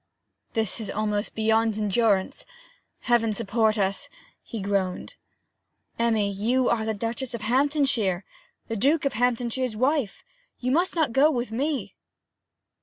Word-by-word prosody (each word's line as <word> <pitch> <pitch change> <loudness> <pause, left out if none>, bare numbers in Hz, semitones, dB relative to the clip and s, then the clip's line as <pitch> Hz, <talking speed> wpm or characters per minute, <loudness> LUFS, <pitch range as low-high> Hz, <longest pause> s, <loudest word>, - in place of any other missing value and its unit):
'This 220 -2 -1
is 220 - -5
almost 210 0 -2
beyond 220 0 +2
endurance 210 -2 +1 0.6
Heaven 230 -2 +2
support 220 +1 +1
us,' 195 -1 -1 0.3
he 230 - -7
groaned. 195 -2 -2 0.8
'Emmy, 220 -3 +2
you 240 +6 +1
are 220 -2 +1
the 220 -1 -1
Duchess 235 +4 -3
of 230 - -6
Hamptonshire, 255 - +1 0.4
the 225 - -3
Duke 285 +8 +2
of 275 - +1
Hamptonshire's 245 0 0
wife; 260 -3 0 0.3
you 250 +1 -2
must 345 +7 +2
not 315 -8 +1
go 280 +4 +5
with 245 -6 -2
me!' 280 +5 -2
230 Hz, 130 wpm, -25 LUFS, 210-255 Hz, 0.8 s, go